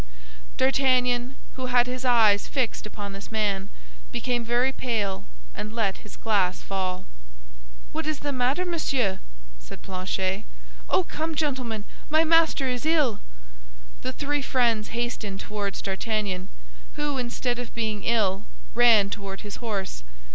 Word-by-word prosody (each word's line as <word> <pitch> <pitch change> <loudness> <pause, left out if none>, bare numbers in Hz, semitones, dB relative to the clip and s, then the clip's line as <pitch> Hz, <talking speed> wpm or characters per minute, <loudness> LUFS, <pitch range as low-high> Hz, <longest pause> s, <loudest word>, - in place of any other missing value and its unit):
D'Artagnan, 255 -1 +3 0.2
who 260 -1 -2
had 245 -1 +5
his 250 +1 -4
eyes 225 -5 +5
fixed 250 -5 -1
upon 205 -1 -6
this 195 +3 -9
man, 205 -3 0 0.4
became 245 - 0
very 240 +3 +2
pale, 215 -7 -1 0.3
and 215 - -5
let 205 -4 +1
his 210 - -12
glass 195 -5 +2
fall. 185 -2 -2 0.9
"What 320 0 -3
is 310 -1 0
the 285 - -1
matter, 260 +7 +1
monsieur?" 265 - 0 0.4
said - - -11
Planchet. 185 0 -2 0.4
"Oh, 370 - +4
come, 320 -1 -3
gentlemen, 255 -8 -1 0.3
my 315 +1 +5
master 325 -4 +4
is 250 -1 -1
ill!" 300 -9 +3 0.8
The - - -2
three 290 - -1
friends 235 -5 +2
hastened 235 -4 -3
toward 205 -2 -3
D'Artagnan, 195 -2 -2 0.5
who, 295 -2 -1
instead 245 0 -1
of 245 - -6
being 220 -3 -1
ill, 205 -4 +2 0.3
ran 230 -4 +6
toward 195 -2 -5
his 205 -1 -6
horse. 195 - -3
235 Hz, 135 wpm, -26 LUFS, 200-260 Hz, 0.9 s, ran